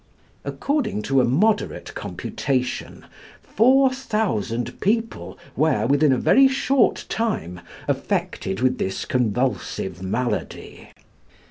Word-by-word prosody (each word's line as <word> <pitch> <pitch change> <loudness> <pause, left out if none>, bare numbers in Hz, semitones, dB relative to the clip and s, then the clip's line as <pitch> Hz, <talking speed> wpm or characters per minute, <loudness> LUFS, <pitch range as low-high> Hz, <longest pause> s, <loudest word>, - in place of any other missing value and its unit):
According 280 - -2
to 135 +3 +3
a - - +3
moderate 205 - 0
computation, 130 -2 -3 0.4
4,000 220 - +1
people 225 +3 -1 0.2
were, 145 -9 +2
within 140 +3 +3
a 130 - +3
very 270 - +5
short 265 -2 +1
time, 195 - -2 0.3
affected 95 +2 -2
with 130 0 +1
this 95 - -2
convulsive 120 -6 -1
malady. 115 +7 -4
135 Hz, 95 wpm, -23 LUFS, -, 0.4 s, very